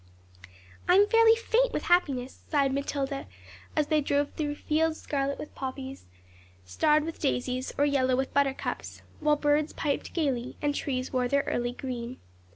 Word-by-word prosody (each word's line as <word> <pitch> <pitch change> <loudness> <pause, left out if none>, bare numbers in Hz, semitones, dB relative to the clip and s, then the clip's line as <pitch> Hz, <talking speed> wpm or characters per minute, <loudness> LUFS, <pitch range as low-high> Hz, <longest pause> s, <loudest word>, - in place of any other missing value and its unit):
'I 360 - +7
am 405 +2 +6
fairly 455 0 +6
faint 470 +2 +2
with - - -2
happiness,' 275 -8 +1
sighed 280 -3 +2
Matilda, 275 0 -2 0.5
as 305 - +2
they 305 0 +2
drove 285 0 0
through 290 -2 -3
fields 315 +2 0
scarlet 280 -1 -2
with 300 - -8
poppies, 265 - -6 0.6
starred 300 - +2
with 330 +1 -6
daisies, 250 - -1
or 285 - +4
yellow 260 -3 +2
with 265 +1 -2
buttercups, 275 -1 -1 0.2
while 300 -1 +3
birds 295 +1 +1
piped 285 -3 -2
gaily, 265 -7 -1
and 290 -1 0
trees 260 -2 -3
wore 250 -1 +1
their 280 +2 +2
early 240 0 -1
green. 250 -1 -5
280 Hz, 160 wpm, -28 LUFS, 260-305 Hz, 0.6 s, I